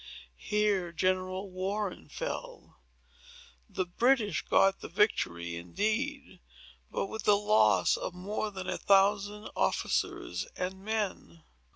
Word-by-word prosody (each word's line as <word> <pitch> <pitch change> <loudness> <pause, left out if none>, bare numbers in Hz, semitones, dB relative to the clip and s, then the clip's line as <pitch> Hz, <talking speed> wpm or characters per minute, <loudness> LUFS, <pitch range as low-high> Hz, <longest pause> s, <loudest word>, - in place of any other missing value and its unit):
Here 205 -4 +1
General 185 +2 -1
Warren 195 +2 -3
fell. - - -6 0.9
The 185 - -2
British 215 - +2
got 195 0 +3
the - - -7
victory, 85 - 0
indeed, 215 - -2 0.5
but - - -2
with 220 +2 -6
the 205 -1 +6
loss 110 - +4
of 180 - -5
more 205 +4 -3
than 190 -2 -7
a - - -2
thousand 205 +1 +2
officers 90 +9 -1
and 190 +1 -4
men." 205 -6 -3
195 Hz, 110 wpm, -30 LUFS, 180-210 Hz, 0.9 s, the